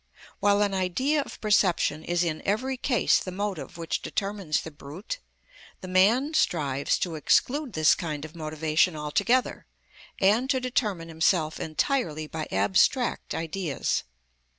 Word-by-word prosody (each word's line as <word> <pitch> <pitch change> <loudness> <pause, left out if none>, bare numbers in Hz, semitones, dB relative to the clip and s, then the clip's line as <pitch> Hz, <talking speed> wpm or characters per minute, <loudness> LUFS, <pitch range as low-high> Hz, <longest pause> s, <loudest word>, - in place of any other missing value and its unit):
While 205 0 +3
an 200 -1 0
idea 255 - +1
of - - -9
perception 185 -7 +2
is 175 +1 0
in 160 -2 -2
every 255 +7 0
case 250 -3 +2
the 185 - -6
motive 195 -3 -4
which 165 -1 -3
determines 195 -6 -2
the 160 - -8
brute, 155 - -7 0.6
the 185 - -7
man 220 +11 +3
strives 145 - +1
to 175 - -2
exclude 255 - +1
this 155 -2 +5
kind 155 -3 -4
of 155 +2 -12
motivation 155 +1 0
altogether, 200 +12 0 0.5
and 215 +7 +3
to 265 -2 +2
determine 215 -9 -1
himself 160 -1 +1
entirely 155 - -1
by 155 0 -5
abstract 190 - +1
ideas. 165 -1 -2
185 Hz, 135 wpm, -26 LUFS, 155-220 Hz, 0.6 s, this